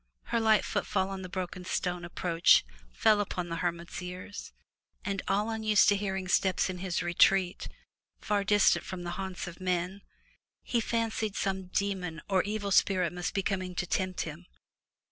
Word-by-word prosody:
Her 235 Hz, -, 0 dB
light 220 Hz, -2 st, +4 dB
footfall 190 Hz, +1 st, -1 dB
on 190 Hz, -1 st, -5 dB
the 185 Hz, -, -7 dB
broken 180 Hz, -1 st, -4 dB
stone 180 Hz, -1 st, -2 dB
approach 170 Hz, -, +3 dB, 0.3 s
fell 210 Hz, -, +4 dB
upon 180 Hz, -3 st, -3 dB
the 165 Hz, -, -3 dB
hermit's 170 Hz, +1 st, -3 dB
ears, 180 Hz, +3 st, -7 dB, 0.5 s
and, 200 Hz, -1 st, -1 dB
all 205 Hz, +3 st, +1 dB
unused 215 Hz, -2 st, +4 dB
to 205 Hz, -, +4 dB
hearing 190 Hz, -2 st, -2 dB
steps 190 Hz, 0 st, +2 dB
in 180 Hz, -, -7 dB
his 185 Hz, -1 st, -2 dB
retreat, 180 Hz, +1 st, +3 dB, 0.5 s
far 205 Hz, -1 st, 0 dB
distant 205 Hz, 0 st, +4 dB
from 185 Hz, -3 st, -6 dB
the 175 Hz, -, -4 dB
haunts 190 Hz, -1 st, -4 dB
of 175 Hz, +1 st, -9 dB
men, 185 Hz, +1 st, -1 dB, 0.6 s
he 235 Hz, -, 0 dB
fancied 225 Hz, -2 st, -1 dB
some 190 Hz, -1 st, -2 dB
demon 185 Hz, -4 st, -2 dB
or 190 Hz, -2 st, +3 dB
evil 205 Hz, 0 st, -3 dB
spirit 185 Hz, -2 st, +3 dB
must 180 Hz, +2 st, -3 dB
be 195 Hz, -, +1 dB
coming 185 Hz, -2 st, -2 dB
to 180 Hz, -, -1 dB
tempt 185 Hz, +1 st, -1 dB
him. 170 Hz, +3 st, -7 dB
190 Hz, 165 wpm, -30 LUFS, 180-200 Hz, 0.6 s, light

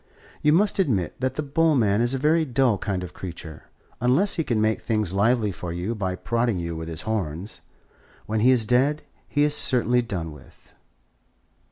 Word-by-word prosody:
You 150 Hz, -, +4 dB
must 200 Hz, +5 st, +2 dB
admit 105 Hz, -, +1 dB
that 130 Hz, 0 st, -1 dB
the 150 Hz, -, -2 dB
bull 155 Hz, +2 st, +2 dB
man 105 Hz, -4 st, +2 dB
is 120 Hz, +3 st, +1 dB
a -, -, 0 dB
very 155 Hz, +4 st, +3 dB
dull 130 Hz, -6 st, +1 dB
kind 95 Hz, -3 st, -2 dB
of 90 Hz, -, -8 dB
creature, 85 Hz, -4 st, -8 dB, 0.3 s
unless 135 Hz, -, +2 dB
he 165 Hz, -, 0 dB
can 120 Hz, -6 st, 0 dB
make 110 Hz, 0 st, +1 dB
things 110 Hz, -5 st, -1 dB
lively 110 Hz, +1 st, +2 dB
for 90 Hz, -1 st, -6 dB
you 90 Hz, +6 st, -3 dB
by 95 Hz, -4 st, -2 dB
prodding 115 Hz, +1 st, -1 dB
you 85 Hz, -1 st, -4 dB
with 80 Hz, 0 st, -6 dB
his 80 Hz, 0 st, -5 dB
horns. 100 Hz, -3 st, -4 dB, 0.6 s
When 110 Hz, 0 st, -1 dB
he 120 Hz, +4 st, +4 dB
is 125 Hz, -4 st, +3 dB
dead, 135 Hz, +6 st, +2 dB, 0.3 s
he 145 Hz, -, +2 dB
is 150 Hz, 0 st, +3 dB
certainly 125 Hz, -3 st, +2 dB
done 90 Hz, -9 st, -4 dB
with." 75 Hz, -4 st, -17 dB
115 Hz, 190 wpm, -24 LUFS, 95-135 Hz, 0.6 s, You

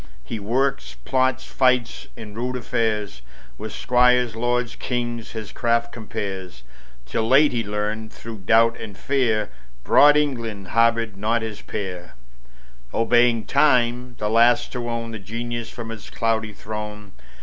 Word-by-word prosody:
He 110 Hz, -, -5 dB
works, 115 Hz, -, -1 dB
plots, 130 Hz, 0 st, +1 dB
fights, 125 Hz, -2 st, +1 dB
in 105 Hz, -2 st, -9 dB
rude 125 Hz, +3 st, -3 dB
affairs, 110 Hz, -, -2 dB, 0.4 s
With 110 Hz, 0 st, -6 dB
squires, 125 Hz, -1 st, +3 dB
lords, 120 Hz, +1 st, 0 dB
kings, 120 Hz, -3 st, -4 dB
his 110 Hz, -2 st, -6 dB
craft 115 Hz, -1 st, 0 dB
compares, 95 Hz, -, -6 dB, 0.4 s
Till 110 Hz, -, -1 dB
late 140 Hz, +5 st, +5 dB
he 120 Hz, -2 st, -1 dB
learned, 105 Hz, +1 st, -3 dB
through 115 Hz, -2 st, -9 dB
doubt 115 Hz, +5 st, +3 dB
and 105 Hz, -3 st, -8 dB
fear, 125 Hz, -6 st, 0 dB, 0.3 s
Broad 145 Hz, -, +6 dB
England 115 Hz, -9 st, -2 dB
harbored 115 Hz, -3 st, +2 dB
not 115 Hz, +3 st, 0 dB
his 110 Hz, -2 st, -6 dB
peer: 90 Hz, -7 st, -6 dB, 0.8 s
Obeying 115 Hz, 0 st, +3 dB
time, 125 Hz, -3 st, +2 dB
the 105 Hz, -, -2 dB
last 115 Hz, +2 st, +4 dB
to 120 Hz, -2 st, -4 dB
own 115 Hz, -1 st, -3 dB
The 110 Hz, -, -6 dB
Genius 115 Hz, +3 st, -5 dB
from 115 Hz, -1 st, -7 dB
its 110 Hz, -2 st, -9 dB
cloudy 110 Hz, -2 st, -1 dB
throne. 105 Hz, 0 st, -7 dB
115 Hz, 140 wpm, -23 LUFS, 105-120 Hz, 0.8 s, Broad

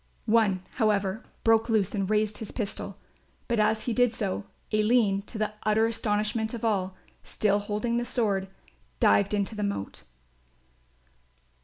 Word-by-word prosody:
One, 215 Hz, -5 st, +3 dB
however, 210 Hz, -2 st, +1 dB, 0.2 s
broke 225 Hz, +1 st, +4 dB
loose 210 Hz, -3 st, +2 dB
and 195 Hz, -2 st, -1 dB
raised 215 Hz, 0 st, +1 dB
his 220 Hz, -, -6 dB
pistol; 215 Hz, -4 st, -5 dB, 0.5 s
but 235 Hz, -2 st, 0 dB
as 215 Hz, +1 st, +2 dB
he 240 Hz, -, -1 dB
did 245 Hz, 0 st, +3 dB
so, 205 Hz, -3 st, -3 dB, 0.3 s
Aline, 215 Hz, -2 st, +3 dB
to 225 Hz, -, -6 dB
the 215 Hz, 0 st, -1 dB
utter 215 Hz, +1 st, +3 dB
astonishment 220 Hz, 0 st, 0 dB
of 230 Hz, -, -4 dB
all, 190 Hz, -4 st, 0 dB, 0.3 s
still 205 Hz, -1 st, +1 dB
holding 210 Hz, +3 st, -1 dB
the 240 Hz, -, -1 dB
sword, 200 Hz, -6 st, 0 dB, 0.5 s
dived 100 Hz, 0 st, +4 dB
into 200 Hz, +1 st, -1 dB
the 210 Hz, -, -4 dB
moat. 200 Hz, -, -3 dB
215 Hz, 145 wpm, -27 LUFS, 200-225 Hz, 0.5 s, broke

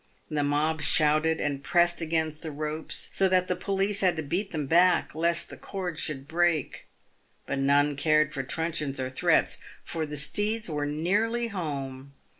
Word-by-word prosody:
The 150 Hz, -1 st, 0 dB
mob 150 Hz, +2 st, 0 dB
shouted 155 Hz, +1 st, +3 dB
and 140 Hz, -1 st, -2 dB
pressed 175 Hz, +2 st, +2 dB
against 160 Hz, -1 st, -1 dB
the 160 Hz, -, -4 dB
ropes, 155 Hz, +1 st, -4 dB
so 190 Hz, -1 st, +3 dB
that 185 Hz, -1 st, +2 dB
the 180 Hz, -, 0 dB
police 195 Hz, +1 st, 0 dB
had 185 Hz, -3 st, +3 dB
to 160 Hz, -, -3 dB
beat 180 Hz, +7 st, -2 dB
them 155 Hz, -5 st, -3 dB
back, 175 Hz, +5 st, +3 dB
lest 170 Hz, +2 st, 0 dB
the -, -, -9 dB
cord 180 Hz, -5 st, -5 dB
should 140 Hz, -3 st, -3 dB
break. 165 Hz, -3 st, 0 dB, 0.6 s
But 140 Hz, -, -2 dB
none 145 Hz, +1 st, +3 dB
cared 155 Hz, +1 st, +2 dB
for 135 Hz, -, -2 dB
truncheons 150 Hz, -1 st, -3 dB
or 130 Hz, 0 st, -3 dB
threats, 130 Hz, -, +2 dB, 0.3 s
for 160 Hz, -2 st, -3 dB
the 150 Hz, 0 st, -4 dB
steeds 210 Hz, +9 st, 0 dB
were 150 Hz, -3 st, -2 dB
nearly 210 Hz, +10 st, 0 dB
home. 140 Hz, -7 st, -5 dB
155 Hz, 170 wpm, -27 LUFS, 145-175 Hz, 0.6 s, shouted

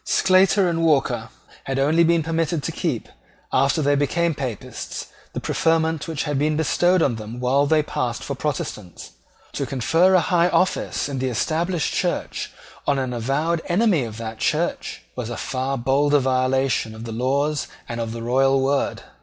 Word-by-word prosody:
Sclater 190 Hz, +1 st, +4 dB
and 165 Hz, -1 st, 0 dB
Walker 150 Hz, -5 st, +1 dB, 0.4 s
had 135 Hz, 0 st, -2 dB
only 155 Hz, +5 st, +3 dB
been 170 Hz, -1 st, +3 dB
permitted 165 Hz, -1 st, -1 dB
to -, -, -2 dB
keep, -, -, -2 dB, 0.5 s
after 135 Hz, +4 st, +2 dB
they 145 Hz, +1 st, +3 dB
became 165 Hz, +4 st, +1 dB
Papists, 130 Hz, -7 st, -5 dB, 0.3 s
the -, -, -3 dB
preferment 160 Hz, -1 st, 0 dB
which 160 Hz, -3 st, -2 dB
had 145 Hz, -3 st, -1 dB
been 150 Hz, +1 st, +1 dB
bestowed 175 Hz, +3 st, +3 dB
on 120 Hz, -5 st, +1 dB
them 110 Hz, +2 st, -7 dB
while 135 Hz, +3 st, +2 dB
they 155 Hz, 0 st, +3 dB
passed 120 Hz, -4 st, -3 dB
for 140 Hz, -, -3 dB
Protestants. 115 Hz, -, -5 dB, 0.4 s
To -, -, -2 dB
confer 165 Hz, +9 st, +3 dB
a -, -, +6 dB
high 175 Hz, +1 st, +2 dB
office 185 Hz, -6 st, 0 dB
in 140 Hz, -2 st, -4 dB
the 130 Hz, 0 st, 0 dB
Established 160 Hz, -, -1 dB
Church -, -, -2 dB, 0.4 s
on 145 Hz, -, +2 dB
an 130 Hz, -2 st, -2 dB
avowed 145 Hz, +8 st, 0 dB
enemy 185 Hz, -, +2 dB
of 110 Hz, -2 st, -7 dB
that 115 Hz, -1 st, -6 dB
Church -, -, -1 dB
was 125 Hz, -2 st, -4 dB
a 120 Hz, -, -5 dB
far 135 Hz, +1 st, -2 dB
bolder 140 Hz, +4 st, +3 dB
violation 130 Hz, -3 st, +1 dB
of 110 Hz, -, -9 dB
the 115 Hz, -, -6 dB
laws 140 Hz, +5 st, 0 dB, 0.2 s
and 120 Hz, 0 st, -4 dB
of 115 Hz, -1 st, -3 dB
the 115 Hz, 0 st, -6 dB
royal 135 Hz, +3 st, +3 dB
word. 135 Hz, +1 st, 0 dB
140 Hz, 170 wpm, -22 LUFS, 130-165 Hz, 0.5 s, a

